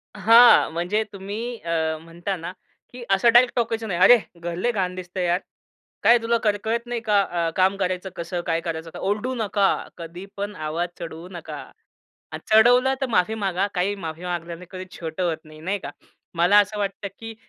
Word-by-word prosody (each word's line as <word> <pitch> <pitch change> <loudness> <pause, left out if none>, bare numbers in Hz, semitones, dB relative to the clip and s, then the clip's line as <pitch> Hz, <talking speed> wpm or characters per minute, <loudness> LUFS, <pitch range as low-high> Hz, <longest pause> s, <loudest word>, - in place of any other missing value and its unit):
हां, 230 +4 +7
म्हणजे 180 +6 0
तुम्ही 210 +5 -5
अ, 160 -1 -1
म्हणता 170 +4 -5
ना 170 +1 -6 0.4
की 250 -1 -8
असं 195 +5 +4
डायरेक्ट 245 0 +5
टोकायचं 230 -2 -1
नाही, 180 -4 -2
"अरे! 245 +6 +8 0.2
घर 170 0 -4
लय 215 +8 0
घाण 185 -5 -2
दिसतंय 180 0 -4
यार! 175 +1 +2 0.6
काय 240 - +7
तुला 230 +1 +1
कर 210 -2 +2
कळत 235 +2 -1
नाही 240 -1 -3
का 210 -3 +3
अ, 170 -3 -1
काम 190 +1 +3
करायचं 185 0 -2
कसं 175 +1 -4
काय 165 0 0
करायचं 165 0 -5
का?" - - -8
ओरडू 210 +6 -1
नका. 205 -3 +1 0.3
कधी 170 +2 -8
पण 205 +1 -4
आवाज 165 +2 -3
चढवू 165 +1 -7
नका. 175 -3 -7 0.7
आणि - - -6
चढवलं 245 +4 +6
तर - - +2
माफी 215 -2 +2
मागा. 195 -2 -1
काही 190 +2 0
माफी 165 -3 -7
मागल्याने 175 0 -5
कधी 185 -1 -7
छोटं 165 +2 -4
होत 170 -3 0
नाही, 155 0 -14
नाही 190 +5 -1
का? 145 - -7 0.4
मला 175 +5 +4
असं 205 +1 0
वाटतं, 200 0 -3
की 225 0 -8
190 Hz, 190 wpm, -23 LUFS, 170-220 Hz, 0.7 s, अरे